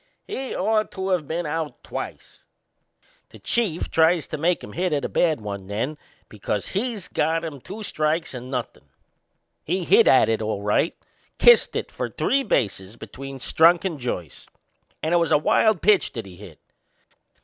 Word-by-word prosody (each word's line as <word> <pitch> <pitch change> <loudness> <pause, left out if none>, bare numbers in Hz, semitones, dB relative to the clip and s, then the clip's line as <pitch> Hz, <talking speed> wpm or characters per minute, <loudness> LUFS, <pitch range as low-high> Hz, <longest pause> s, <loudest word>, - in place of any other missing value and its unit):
He'd 270 -11 -5
ought 215 +2 +1
to 190 0 -3
of 170 -6 0
been 170 +2 -2
out 155 0 -4
twice. - - -8 0.9
The - - -14
Chief 205 -9 -1
tries 160 -1 +3
to 155 - -4
make 175 +3 +1
him - - -9
hit 180 -1 -1
at 140 -3 0
a - - -3
bad 160 -8 +1
one 100 -2 -6
then, 115 +9 -2 0.3
because 105 -1 -4
he'd 215 -1 -3
got 165 +2 0
him 145 -5 -7
two 215 - -8
strikes 155 -3 -1
and 125 0 -7
nothin'. 125 - -5 0.8
He 180 +3 -1
hit - - +5
at 130 - +6
it 110 0 0
all 105 -2 -3
right 105 +10 +1 0.4
kissed 480 0 +6
it - - -3
for - - -4
three 275 - +1
bases 100 - -1
between 135 +2 -9
Strunk 165 +7 +4
and 165 -6 -3
Joyce! 90 - -5 0.6
And 160 +2 0
it - - +5
was 170 -2 +1
a - - +6
wild 205 +6 +2
pitch 210 -2 +3
that 115 -4 -5
he 95 -2 -12
hit. 90 -4 -13
160 Hz, 175 wpm, -23 LUFS, 120-180 Hz, 0.9 s, at